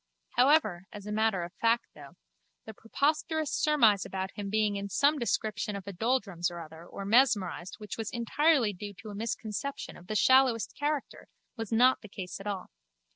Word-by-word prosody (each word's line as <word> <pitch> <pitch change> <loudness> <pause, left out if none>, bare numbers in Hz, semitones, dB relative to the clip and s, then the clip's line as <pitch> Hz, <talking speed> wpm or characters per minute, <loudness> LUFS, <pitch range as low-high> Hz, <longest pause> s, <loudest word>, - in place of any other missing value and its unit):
However, 245 - +3
as 205 -1 -9
a 210 - -5
matter 215 -4 +1
of 170 - -8
fact 230 +1 +3
though, 145 -2 -13 0.5
the 220 - -8
preposterous 305 +7 -1
surmise 230 -10 +4
about 190 0 -4
him 200 -1 -6
being 210 0 +1
in 200 0 -4
some 285 +8 +3
description 215 -3 -1
of 195 - -7
a 200 - -6
doldrums 200 -4 0
or 175 0 -8
other 160 0 -10
or 195 - -7
mesmerised 205 -5 +2
which 210 +1 -7
was 220 - -2
entirely 240 0 +2
due 200 +2 -8
to 215 - -10
a - - -8
misconception 225 +5 -4
of 180 - -15
the 215 - -3
shallowest 260 -1 +4
character, 290 -1 -3 0.3
was 225 -3 -6
not 250 +3 +4
the 215 - -12
case 185 -2 -7
at 195 - -8
all. 200 -2 -4
215 Hz, 180 wpm, -30 LUFS, 195-255 Hz, 0.5 s, surmise